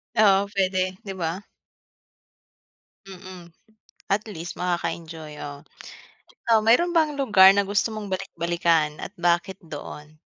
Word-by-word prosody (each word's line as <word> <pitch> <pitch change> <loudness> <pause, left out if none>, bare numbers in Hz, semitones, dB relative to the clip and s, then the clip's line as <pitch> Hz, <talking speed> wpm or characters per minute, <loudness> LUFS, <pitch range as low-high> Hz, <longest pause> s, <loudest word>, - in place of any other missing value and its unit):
Oo, 200 -2 +4
puwede, 185 -2 -1
'di 195 - -6
ba? 170 +4 -3 1.6
Mm. 185 -3 -12 0.6
At 205 +2 0
least 175 -5 -8
makaka-enjoy, 165 -3 -4
oo. 145 -1 -8 0.8
Ikaw, 230 -1 +5
mayro'n 245 +11 +3
bang 310 -4 +2
lugar 210 -9 +7
na 200 - +2
gusto 205 +3 0
mong 215 -1 -6
balik-balikan 170 -4 0
at - - -7
bakit 175 +2 0
doon? 150 0 -10
185 Hz, 115 wpm, -24 LUFS, 170-205 Hz, 1.6 s, lugar